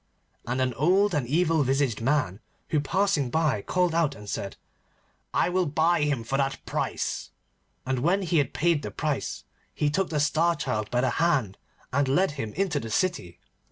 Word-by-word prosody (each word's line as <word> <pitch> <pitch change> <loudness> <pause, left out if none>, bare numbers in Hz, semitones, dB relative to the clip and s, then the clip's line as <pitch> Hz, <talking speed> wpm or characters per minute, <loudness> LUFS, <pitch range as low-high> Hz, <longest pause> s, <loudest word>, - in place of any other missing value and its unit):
And 125 +2 -1
an 130 -1 +1
old 185 - +3
and 140 -6 0
evil 160 +2 +2
visaged 135 -4 +1
man 130 -6 0 0.3
who 155 - +2
was 145 - -5
passing 185 -7 +1
by 155 -7 +1
called 180 - +1
out, 165 -4 +1
and 105 -1 -11
said, 100 -1 -4 0.7
'I - - +2
will 180 0 +1
buy 160 +3 +2
him 145 -5 0
for 135 +4 -1
that 135 0 0
price,' - - -2 0.6
and, 130 -1 -1
when 180 +9 +2
he 170 -2 +2
had 140 - 0
paid 170 -2 +1
the - - -5
price, 150 -3 -3 0.3
he 150 -1 +1
took 190 +4 0
the 150 - -1
Star 165 +4 +2
Child 105 -7 -2
by 125 0 +1
the 130 - +2
hand 135 - +1 0.3
and 140 0 +2
led 150 +6 +2
him 115 -7 -5
into 185 -6 0
the 115 - -6
city. 105 - -1
145 Hz, 190 wpm, -26 LUFS, 130-170 Hz, 0.7 s, old